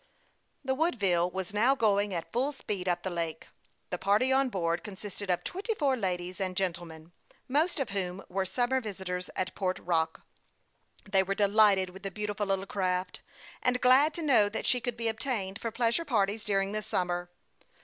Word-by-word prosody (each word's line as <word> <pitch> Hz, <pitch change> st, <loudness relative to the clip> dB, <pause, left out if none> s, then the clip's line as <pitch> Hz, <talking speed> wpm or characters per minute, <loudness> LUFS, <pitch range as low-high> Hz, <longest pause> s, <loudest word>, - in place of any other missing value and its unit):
The 265 Hz, -, +1 dB
Woodville 200 Hz, -, +1 dB
was 190 Hz, +1 st, -5 dB
now 240 Hz, +6 st, +4 dB
going 205 Hz, -4 st, +2 dB
at 170 Hz, -3 st, -4 dB
full 265 Hz, +5 st, 0 dB
speed 200 Hz, -8 st, -4 dB
up 175 Hz, -1 st, 0 dB
ths 185 Hz, -, -2 dB
lake. 165 Hz, -2 st, -3 dB, 0.5 s
The 180 Hz, -, -2 dB
party 210 Hz, +7 st, +3 dB
on 270 Hz, 0 st, +3 dB
board 170 Hz, -5 st, -1 dB
consisted 200 Hz, -1 st, -7 dB
of 180 Hz, -, +1 dB
twenty 410 Hz, +5 st, -3 dB
four 280 Hz, -7 st, +2 dB
ladies 180 Hz, -3 st, -3 dB
and 185 Hz, -1 st, -1 dB
gentlemen, 170 Hz, -3 st, -3 dB, 0.4 s
most 310 Hz, +6 st, +2 dB
of 265 Hz, -7 st, -2 dB
whom 190 Hz, -1 st, -2 dB
were 190 Hz, +1 st, -1 dB
sum 245 Hz, +6 st, 0 dB
mer 260 Hz, 0 st, +2 dB
visitors 190 Hz, -4 st, -4 dB
at 185 Hz, 0 st, -2 dB
Port 185 Hz, -2 st, -1 dB
Rock. 160 Hz, -2 st, -1 dB, 0.8 s
They 195 Hz, -1 st, +3 dB
were 195 Hz, +1 st, -1 dB
delighted 200 Hz, -2 st, +4 dB
with 190 Hz, +1 st, -12 dB
the 195 Hz, -, -4 dB
beautiful 205 Hz, +1 st, -3 dB
little 195 Hz, 0 st, 0 dB
craft, 185 Hz, -2 st, -1 dB, 0.4 s
and 250 Hz, 0 st, +2 dB
glad 265 Hz, +5 st, +5 dB
to 335 Hz, -, -3 dB
know 240 Hz, -9 st, +5 dB
that 215 Hz, -, -4 dB
she 250 Hz, -, +2 dB
could 245 Hz, -1 st, -3 dB
be 230 Hz, 0 st, -1 dB
obtained 220 Hz, -4 st, -2 dB
for 230 Hz, -, -2 dB
pleasure 235 Hz, +7 st, +1 dB
parties 215 Hz, -6 st, 0 dB
during 195 Hz, -1 st, +1 dB
the 215 Hz, +1 st, -1 dB
summer. 180 Hz, -4 st, -1 dB
200 Hz, 185 wpm, -30 LUFS, 185-240 Hz, 0.8 s, glad